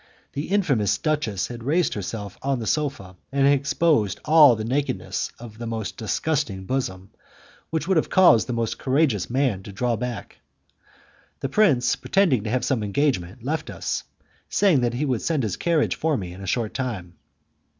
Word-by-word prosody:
The 145 Hz, +2 st, -3 dB
infamous 145 Hz, -, +2 dB
duchess 145 Hz, -, -1 dB
had 120 Hz, -1 st, -7 dB
raised 155 Hz, +4 st, +1 dB
herself 105 Hz, 0 st, -5 dB
on 135 Hz, 0 st, 0 dB
the 115 Hz, -, -5 dB
sofa 135 Hz, -11 st, -2 dB
and 135 Hz, 0 st, +2 dB
exposed 140 Hz, -, +2 dB
all 150 Hz, -5 st, +7 dB
the 110 Hz, 0 st, -4 dB
nakedness 135 Hz, +2 st, -2 dB
of 115 Hz, -2 st, -11 dB
the 120 Hz, -, -5 dB
most 110 Hz, -4 st, -4 dB
disgusting 115 Hz, -3 st, -2 dB
bosom, 95 Hz, -7 st, -3 dB, 0.6 s
which 160 Hz, +1 st, -2 dB
would 190 Hz, -2 st, +3 dB
have 155 Hz, -, +1 dB
caused 175 Hz, -12 st, +5 dB
the 125 Hz, -, -2 dB
most 115 Hz, -1 st, -2 dB
courageous 130 Hz, -, +1 dB
man 125 Hz, -6 st, 0 dB
to 100 Hz, -, -10 dB
draw 120 Hz, +4 st, 0 dB
back. 115 Hz, -3 st, -6 dB, 1.0 s
The 135 Hz, -, -2 dB
prince, 140 Hz, -, +3 dB
pretending 170 Hz, -, +2 dB
to -, -, -2 dB
have 125 Hz, +1 st, 0 dB
some 130 Hz, -3 st, 0 dB
engagement, 105 Hz, -2 st, -1 dB
left 155 Hz, +5 st, -2 dB
us, -, -, -3 dB, 0.5 s
saying 185 Hz, -10 st, +3 dB
that 120 Hz, -1 st, 0 dB
he 145 Hz, +5 st, -1 dB
would 130 Hz, -5 st, -1 dB
send 155 Hz, -6 st, 0 dB
his 105 Hz, -5 st, -1 dB
carriage 170 Hz, -3 st, +1 dB
for 160 Hz, -3 st, 0 dB
me 90 Hz, -3 st, -6 dB
in 95 Hz, -, -11 dB
a 95 Hz, -, -7 dB
short 115 Hz, -1 st, -1 dB
time. 105 Hz, -10 st, -4 dB
125 Hz, 175 wpm, -24 LUFS, 110-150 Hz, 1.0 s, all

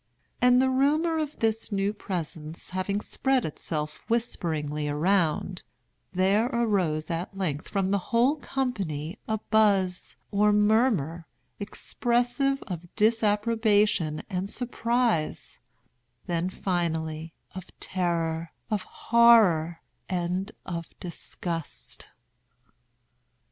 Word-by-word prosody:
And 250 Hz, 0 st, +6 dB
the 260 Hz, 0 st, +3 dB
rumor 305 Hz, +5 st, +2 dB
of 300 Hz, -1 st, -3 dB
this 225 Hz, 0 st, -1 dB
new 200 Hz, +1 st, 0 dB
presence 165 Hz, -6 st, -5 dB
having 185 Hz, +2 st, -1 dB
spread 265 Hz, +2 st, +1 dB
itself 150 Hz, 0 st, -4 dB
whisperingly 155 Hz, -10 st, -1 dB
around, 175 Hz, +3 st, +1 dB, 0.5 s
there 195 Hz, +5 st, +3 dB
arose 195 Hz, -, 0 dB
at 175 Hz, +4 st, -4 dB
length 155 Hz, -7 st, -2 dB
from 195 Hz, -2 st, 0 dB
the 200 Hz, -, +2 dB
whole 245 Hz, +6 st, +3 dB
company 195 Hz, -, -3 dB
a 220 Hz, -, 0 dB
buzz, 200 Hz, -4 st, +2 dB, 0.2 s
or 210 Hz, +1 st, +4 dB
murmur, 210 Hz, -, +2 dB, 0.3 s
expressive 245 Hz, +6 st, 0 dB
of 175 Hz, -3 st, -6 dB
disapprobation 210 Hz, -6 st, +2 dB
and 190 Hz, -1 st, -3 dB
surprise—then, 170 Hz, -, -2 dB
finally, 165 Hz, -4 st, -2 dB, 0.2 s
of 185 Hz, -2 st, -8 dB
terror, 165 Hz, -3 st, -1 dB, 0.2 s
of 210 Hz, -2 st, +1 dB
horror, 200 Hz, -10 st, +4 dB, 0.3 s
and 180 Hz, +2 st, -1 dB
of 170 Hz, -2 st, -6 dB
disgust. 170 Hz, -2 st, -5 dB
195 Hz, 95 wpm, -27 LUFS, 165-225 Hz, 0.5 s, And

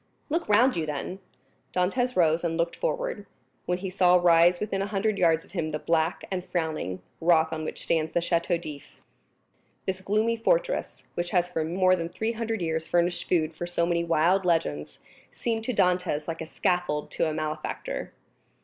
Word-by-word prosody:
"Look 335 Hz, -1 st, -1 dB
round 240 Hz, +5 st, +5 dB
you 160 Hz, -2 st, -1 dB
then." 150 Hz, +6 st, -4 dB, 0.5 s
Dantès 245 Hz, +8 st, 0 dB
rose 165 Hz, -1 st, +3 dB
and 165 Hz, -1 st, -1 dB
looked 170 Hz, 0 st, 0 dB
forward, -, -, -2 dB, 0.4 s
when 180 Hz, -, +1 dB
he 190 Hz, 0 st, -5 dB
saw 180 Hz, -1 st, +4 dB
rise 175 Hz, 0 st, +5 dB
within 195 Hz, -2 st, -2 dB
a 195 Hz, -, -1 dB
hundred 205 Hz, 0 st, 0 dB
yards 165 Hz, -2 st, +3 dB
of -, -, -22 dB
him 170 Hz, -4 st, -2 dB
the 155 Hz, -, -2 dB
black 160 Hz, +1 st, 0 dB
and 185 Hz, -1 st, -2 dB
frowning 155 Hz, -, -3 dB, 0.2 s
rock 160 Hz, -1 st, +3 dB
on 155 Hz, 0 st, -3 dB
which -, -, -5 dB
stands 160 Hz, -1 st, 0 dB
the -, -, +2 dB
Château 170 Hz, 0 st, 0 dB
d'If. 150 Hz, -4 st, -10 dB, 0.9 s
This 190 Hz, 0 st, -2 dB
gloomy 215 Hz, +4 st, +1 dB
fortress, -, -, 0 dB
which 175 Hz, 0 st, -2 dB
has 175 Hz, -1 st, +2 dB
for 165 Hz, -3 st, -1 dB
more 185 Hz, +3 st, +3 dB
than 170 Hz, -2 st, -4 dB
three 220 Hz, +5 st, -2 dB
hundred 225 Hz, -3 st, -3 dB
years 160 Hz, 0 st, -2 dB
furnished 175 Hz, 0 st, 0 dB
food 165 Hz, -3 st, +2 dB
for 175 Hz, +2 st, -4 dB
so 175 Hz, -1 st, 0 dB
many 170 Hz, 0 st, +1 dB
wild 170 Hz, +4 st, +3 dB
legends, 120 Hz, -, 0 dB, 0.3 s
seemed 225 Hz, -2 st, -2 dB
to 255 Hz, -, 0 dB
Dantès 180 Hz, -7 st, +1 dB
like 165 Hz, -1 st, -4 dB
a 160 Hz, -, -5 dB
scaffold 175 Hz, -5 st, -1 dB
to 160 Hz, -, 0 dB
a -, -, -3 dB
malefactor. 155 Hz, 0 st, -4 dB
175 Hz, 185 wpm, -27 LUFS, 160-195 Hz, 0.9 s, round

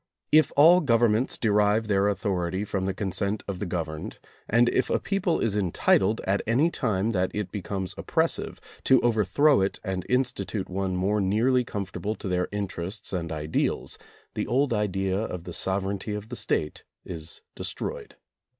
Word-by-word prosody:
If 155 Hz, 0 st, +5 dB
all 170 Hz, +5 st, +7 dB
gov 115 Hz, -5 st, +2 dB
ernments 115 Hz, +2 st, +2 dB
derive 105 Hz, 0 st, +3 dB
their 100 Hz, -1 st, +2 dB
authority 95 Hz, -1 st, -1 dB
from 95 Hz, -2 st, -2 dB
the 95 Hz, -, -1 dB
consent 100 Hz, +2 st, -2 dB
of 100 Hz, -3 st, -4 dB
the 100 Hz, -, -3 dB
governed, 80 Hz, -3 st, -4 dB, 0.3 s
and 120 Hz, +2 st, +4 dB
if 130 Hz, -, +1 dB
a -, -, +2 dB
people 195 Hz, -4 st, 0 dB
is 110 Hz, -3 st, 0 dB
entitled, 95 Hz, +2 st, +2 dB
at 100 Hz, +1 st, +1 dB
any 135 Hz, +9 st, +3 dB
time 110 Hz, -, 0 dB
that 90 Hz, -3 st, +1 dB
it 105 Hz, -3 st, -3 dB
becomes 95 Hz, -2 st, -3 dB
oppressive, -, -, 0 dB, 0.3 s
to 130 Hz, -1 st, +6 dB
overthrow 120 Hz, +4 st, +3 dB
it 95 Hz, -, -1 dB
and 95 Hz, -3 st, -3 dB
institute 125 Hz, -5 st, -1 dB
one 95 Hz, 0 st, -1 dB
more 100 Hz, +3 st, +1 dB
nearly 115 Hz, +7 st, +2 dB
conformable 100 Hz, 0 st, -4 dB
to 105 Hz, -, -7 dB
their 90 Hz, -1 st, +1 dB
in 100 Hz, -1 st, -3 dB
terests 95 Hz, +4 st, -5 dB
and 85 Hz, -3 st, -2 dB
ideals, 75 Hz, 0 st, -2 dB, 0.3 s
the -, -, -2 dB
old 135 Hz, 0 st, +2 dB
idea 95 Hz, -2 st, 0 dB
of 90 Hz, -6 st, -4 dB
the 90 Hz, -, -8 dB
sovereignty 100 Hz, +3 st, -1 dB
of 105 Hz, +1 st, -7 dB
the 125 Hz, -, -5 dB
State 75 Hz, -8 st, -2 dB, 0.2 s
is 80 Hz, -3 st, -7 dB
destroyed. -, -, -6 dB
100 Hz, 170 wpm, -26 LUFS, 95-115 Hz, 0.3 s, all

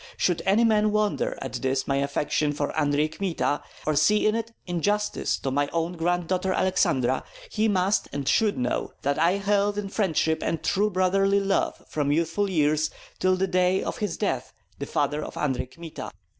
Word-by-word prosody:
Should 180 Hz, -2 st, +1 dB
any 205 Hz, +4 st, +4 dB
man 215 Hz, -2 st, +3 dB
wonder 210 Hz, -1 st, 0 dB
at 130 Hz, -2 st, -6 dB
this 130 Hz, 0 st, 0 dB
my 140 Hz, -, +1 dB
affection 145 Hz, +1 st, 0 dB
for 145 Hz, 0 st, -3 dB
Andrei 150 Hz, 0 st, +2 dB
Kmita, 160 Hz, -3 st, -1 dB, 0.2 s
or 155 Hz, -, +1 dB
see 210 Hz, +9 st, +3 dB
in 215 Hz, -, +4 dB
it 230 Hz, 0 st, -3 dB
injustice 205 Hz, +4 st, 0 dB
to 135 Hz, -, -3 dB
my 145 Hz, +1 st, +1 dB
own 165 Hz, +1 st, -1 dB
granddaughter 175 Hz, +2 st, 0 dB
Aleksandra, 130 Hz, -9 st, +1 dB, 0.3 s
he 215 Hz, +1 st, +1 dB
must 195 Hz, 0 st, +1 dB
and 140 Hz, -2 st, -4 dB
should 215 Hz, +6 st, +2 dB
know 125 Hz, -1 st, -2 dB
that 140 Hz, +2 st, 0 dB
I 170 Hz, +3 st, +4 dB
held 200 Hz, +1 st, +1 dB
in 205 Hz, -1 st, -3 dB
friendship 160 Hz, -6 st, 0 dB
and 165 Hz, -, -2 dB
true 205 Hz, +2 st, +2 dB
brotherly 195 Hz, +1 st, +2 dB
love 195 Hz, 0 st, 0 dB
from 145 Hz, -2 st, -1 dB
youthful 165 Hz, +6 st, 0 dB
years 155 Hz, -2 st, +2 dB, 0.3 s
till 185 Hz, 0 st, +3 dB
the 185 Hz, +1 st, +1 dB
day 185 Hz, 0 st, +2 dB
of -, -, -4 dB
his 205 Hz, -6 st, -2 dB
death -, -, -2 dB, 0.3 s
the -, -, -4 dB
father 150 Hz, +1 st, 0 dB
of -, -, -8 dB
Andrei 130 Hz, -3 st, -1 dB
Kmita. 165 Hz, +3 st, -8 dB
175 Hz, 180 wpm, -26 LUFS, 150-200 Hz, 0.3 s, any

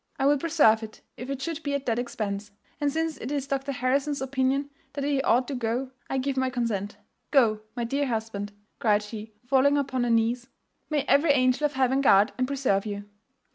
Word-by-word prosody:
'I 270 Hz, -, 0 dB
will 290 Hz, +1 st, +5 dB
preserve 290 Hz, -9 st, +4 dB
it 220 Hz, -1 st, -9 dB
if 250 Hz, +3 st, -8 dB
it 275 Hz, -1 st, -3 dB
should 325 Hz, +1 st, -3 dB
be 285 Hz, -2 st, -2 dB
at 280 Hz, -1 st, -3 dB
that 235 Hz, -1 st, 0 dB
expense; 210 Hz, -4 st, -3 dB, 0.3 s
and 290 Hz, -1 st, +1 dB
since 320 Hz, +1 st, -1 dB
it 250 Hz, -, -6 dB
is 285 Hz, -2 st, -1 dB
Dr 275 Hz, 0 st, -2 dB
Harrison's 275 Hz, +3 st, 0 dB
opinion 270 Hz, +1 st, 0 dB, 0.2 s
that 280 Hz, 0 st, -3 dB
he 280 Hz, -1 st, +1 dB
ought 245 Hz, 0 st, +2 dB
to -, -, -2 dB
go, 250 Hz, +1 st, -2 dB, 0.2 s
I 270 Hz, -, -1 dB
give 270 Hz, +1 st, -1 dB
my 260 Hz, 0 st, +2 dB
consent. 215 Hz, -5 st, -2 dB, 0.3 s
Go, 225 Hz, -7 st, +3 dB
my 240 Hz, -, -2 dB
dear 275 Hz, +4 st, 0 dB
husband,' 220 Hz, -3 st, -3 dB, 0.3 s
cried 210 Hz, -2 st, +3 dB
she, 215 Hz, 0 st, -8 dB
falling 275 Hz, +3 st, +4 dB
upon 260 Hz, -3 st, 0 dB
her 240 Hz, -, 0 dB
knees: 230 Hz, +2 st, +1 dB, 0.4 s
'may 300 Hz, -3 st, +1 dB
every 285 Hz, +3 st, +3 dB
angel 255 Hz, +1 st, +3 dB
of 295 Hz, -, 0 dB
heaven 265 Hz, +1 st, +2 dB
guard 205 Hz, -4 st, +5 dB
and 255 Hz, -, +1 dB
preserve 255 Hz, -8 st, 0 dB
you! 205 Hz, 0 st, -5 dB
260 Hz, 205 wpm, -27 LUFS, 225-280 Hz, 0.4 s, will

